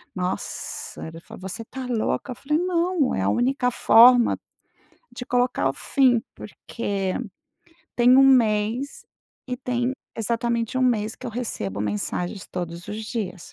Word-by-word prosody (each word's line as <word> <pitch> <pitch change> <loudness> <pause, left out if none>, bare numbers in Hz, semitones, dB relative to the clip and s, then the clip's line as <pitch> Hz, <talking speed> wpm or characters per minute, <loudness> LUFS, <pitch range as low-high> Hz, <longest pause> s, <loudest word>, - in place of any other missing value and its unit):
Nossa, 180 -1 -4
ele 165 +1 -9
falou: - - -12
"Você 190 +5 -5
está 260 +3 -7
louca?" 245 +2 -1
Eu - - -15
falei 300 +5 -1
"Não, 350 -4 +1
é - - -1
a - - +2
única 250 +1 +1
forma 240 +1 +6 0.8
de 245 - -7
colocar 245 - +1
o - - 0
fim." 245 - +2
Porque 200 -5 -4 0.8
tem 245 +1 +6
1 270 0 +7
mês 235 +1 +2 0.4
e 250 - -2
tem 245 0 -1 0.2
exatamente 235 +1 -1
1 - - +2
mês 225 -4 +1
que 255 - -8
eu - - -4
recebo 105 - -4
mensagens 105 - -3
todos 175 -1 -6
os 215 +1 -5
dias. 205 -6 -5
235 Hz, 145 wpm, -24 LUFS, 200-255 Hz, 0.8 s, 1